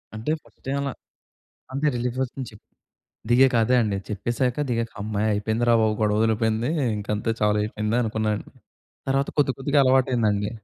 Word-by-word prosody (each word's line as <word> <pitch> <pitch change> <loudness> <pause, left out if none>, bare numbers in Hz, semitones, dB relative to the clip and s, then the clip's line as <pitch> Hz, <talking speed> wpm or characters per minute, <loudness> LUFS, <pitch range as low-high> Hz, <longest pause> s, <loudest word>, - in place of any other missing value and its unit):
అంటే 110 +7 -2
first - - -25
time 135 +1 -1
అలా, 140 -1 -2 0.8
అంతే 140 +3 -1
రిలీఫ్ 120 +1 -2
వస్తుందని 130 -1 -5
చెప్ప్ 105 - -17 0.7
దిగాక 130 +2 +5
అదే 125 +3 +2
అండి 105 -2 -1
చెప్పేసాక 120 +5 -1
దిగాక 115 -1 -1
హమ్మయ్య 105 +1 -1
అయిపోయిందిరా 110 +3 +1
బాబు 110 -1 +2
గొడవ 105 -1 +2
వదిలిపోయింది 110 +2 +1 0.3
ఇంక 105 - -7
అంతే 105 +2 -2
చాలా 105 0 +3
అయిపోయింది 105 +1 -2
అనుకున్నాను. 110 -2 -1 0.6
తర్వాత 135 +1 +1
కొద్దికొద్దిగా 140 +1 +1
అలవాటయిందండి. 120 -6 +2
115 Hz, 145 wpm, -24 LUFS, 105-130 Hz, 0.8 s, దిగాక